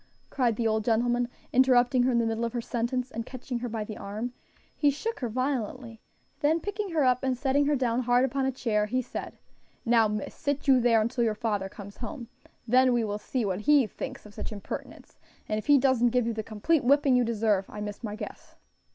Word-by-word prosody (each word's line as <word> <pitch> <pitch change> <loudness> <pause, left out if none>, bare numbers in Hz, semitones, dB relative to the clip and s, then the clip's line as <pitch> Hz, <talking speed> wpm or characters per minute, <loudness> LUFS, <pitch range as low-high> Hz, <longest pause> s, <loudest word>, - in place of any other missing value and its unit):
cried 245 -4 +1
the 230 - -2
old 220 0 +1
gentleman, 240 +2 +1 0.3
interrupting 255 0 +4
her 255 +1 +3
in 240 - +2
the 230 - +2
middle 225 +1 -1
of 230 - -2
her 240 - -1
sentence; 240 +2 -2
and 230 - -4
catching 250 0 -5
her 245 0 -4
by 220 -1 -3
the 210 0 -7
arm, 215 +5 -5 0.4
he 290 - +3
shook 375 +10 -3
her 245 -4 -2
violently; 245 -2 -3 0.4
then 310 +3 +2
picking 410 +3 -4
her 320 -4 +1
up 250 -1 +3
and 260 -1 0
setting 280 +2 +2
her 295 - +3
down 245 -3 0
hard 245 +1 +3
upon 270 +1 -1
a 265 - +1
chair, 215 -5 0
he 255 +4 0
said, 255 - -6 0.5
"Now, 230 -2 +4
miss, 210 -1 -4
sit 285 0 -3
you 265 -2 +6
there 230 -2 +4
until 235 +2 0
your 220 -2 +1
father 205 -3 -2
comes 200 +1 -11
home, 235 +1 -7 0.4
then 255 +2 +5
we 240 -1 +2
will 205 -1 -3
see 245 +1 -2
what 190 0 -2
he 290 +2 +5
thinks 265 +5 -7
of 210 - -13
such - - -6
impertinence; 205 -2 -8 0.3
and 215 0 -1
if 215 - -10
he 290 -1 +7
doesn't 255 -3 +3
give 250 0 +1
you 230 - -1
the 220 - -3
complete 225 +9 0
whipping 280 +1 +4
you 250 - +4
deserve, 215 -4 0
I 210 - -8
miss 210 +2 -6
my 210 -2 -4
guess." 215 - -9
240 Hz, 225 wpm, -28 LUFS, 220-260 Hz, 0.5 s, he